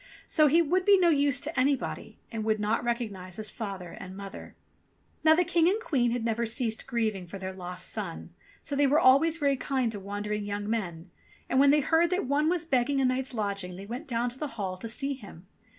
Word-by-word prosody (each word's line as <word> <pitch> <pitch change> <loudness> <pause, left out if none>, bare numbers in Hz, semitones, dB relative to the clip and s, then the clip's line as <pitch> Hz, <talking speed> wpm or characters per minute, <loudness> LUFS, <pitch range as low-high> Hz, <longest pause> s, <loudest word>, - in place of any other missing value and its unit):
So 305 -2 +4
he 330 +4 +5
would 360 +4 +1
be 400 +1 +6
no 355 -2 +4
use 285 -2 +3
to 310 -2 -3
anybody, 275 0 -1
and 225 -2 -3
would 215 0 +1
not 210 +3 0
recognize 210 -7 -3
his 215 0 -3
father 195 -6 -6
and 185 +1 -9
mother. 200 -1 -9 0.7
Now 315 0 +7
the 360 - +3
King 340 0 +3
and 410 +4 +1
Queen 270 - +1
had 235 -1 -2
never 230 0 0
ceased 225 -1 -2
grieving 215 -6 -1
for 195 - -7
their 190 0 -5
lost 180 -1 -5
son, - - -4 0.3
so 285 - -3
they 285 0 +4
were 295 +3 +4
always 320 +3 +5
very 285 -3 +2
kind 260 -3 -1
to 205 - -6
wandering 205 +1 -4
young 205 0 -4
men, 180 -6 -3 0.4
and 260 - +2
when 280 +1 +6
they 295 +1 +5
heard 330 +4 +3
that 365 -3 0
one 290 +4 +2
was 345 -1 0
begging 275 -1 +1
a 265 - +3
night's 255 0 -1
lodging, 200 -4 -3
they 195 +2 -8
went 245 +8 -6
down 240 -1 0
to 255 - -12
the 300 - -2
hall 190 -3 -2
to 225 +5 -7
see 275 +4 -2
him. 200 -9 -12
240 Hz, 225 wpm, -28 LUFS, 205-285 Hz, 0.7 s, Now